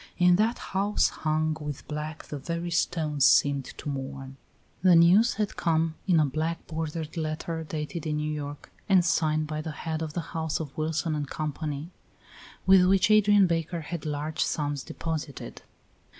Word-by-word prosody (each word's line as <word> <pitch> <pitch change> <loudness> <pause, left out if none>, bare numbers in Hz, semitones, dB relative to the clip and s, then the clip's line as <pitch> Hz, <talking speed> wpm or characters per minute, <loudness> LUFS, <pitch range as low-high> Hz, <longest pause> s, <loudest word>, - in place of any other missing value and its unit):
In 180 0 +5
that 225 +4 +2 0.2
house 200 +2 +2
hung 155 0 -1
with 150 -2 -6
black 150 +1 -5
the 145 - -7
very 170 +4 -4
stones 155 -4 0
seemed 140 -1 +4
to - - -8
mourn. 135 -1 -5 0.5
The 180 -1 +6
news 180 +8 +6
had 210 -2 -2
come 165 -1 +1
in 175 -4 +4
a 155 - +4
black 155 +4 -2
bordered 160 -1 -4
letter 160 +1 -3
dated 155 +1 -5
in 150 -1 -1
New 150 0 -2
York 145 -1 -7 0.2
and 185 -3 +5
signed 155 -2 +1
by 155 0 -4
the 160 - -5
head 160 +1 -4
of 155 -2 -4
the 170 - -2
house 160 -1 -1
of 150 -4 -6
Wilson 155 +1 -1
and 145 -2 -3
Company, 150 +1 -4 0.7
with 190 -1 +7
which 195 +2 +4
Adrian 205 -2 +6
Baker 170 0 -1
had 160 +1 -6
large 150 +1 -1
sums 145 -2 -2
deposited. 155 -3 -5
160 Hz, 165 wpm, -27 LUFS, 150-170 Hz, 0.7 s, with